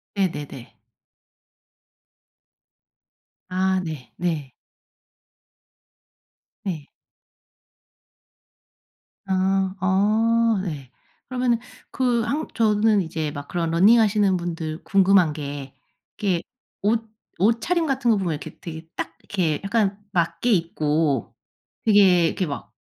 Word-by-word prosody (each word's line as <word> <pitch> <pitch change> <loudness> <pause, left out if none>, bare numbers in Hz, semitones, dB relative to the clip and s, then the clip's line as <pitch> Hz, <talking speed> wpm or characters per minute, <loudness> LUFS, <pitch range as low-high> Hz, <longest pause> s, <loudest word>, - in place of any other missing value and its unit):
네네네. 145 - -3 2.7
아 190 +1 +1
네네. 155 -1 -4 2.1
네. 160 -7 -4 2.4
아 190 0 +1
어 215 +4 +3
네. 145 -9 -6 0.4
그러면은 250 -2 +1 0.3
그 245 -3 +1
한 285 +7 -2
저는 215 -2 +3
이제 160 -3 -3
막 145 0 -7
그런 170 -2 -2
러닝하시는 205 +2 +4
분들 165 -2 -4
궁금한 190 -4 +4
게 140 -2 -6 0.4
그게 185 -5 0 0.4
옷 225 +2 +1 0.3
옷차림 235 - +2
같은 265 -4 0
거 215 - +3
보면 180 -4 -1
이렇게 150 +1 -8
되게 160 -1 -8
딱 165 - -5
이렇게 165 -7 -1
약간 200 -1 +1
맞게 170 +6 0
입고 155 - 0 0.5
되게 195 -5 +6
이렇게 185 - -1
막 145 -3 -6
185 Hz, 175 characters per minute, -23 LUFS, 160-215 Hz, 2.7 s, 되게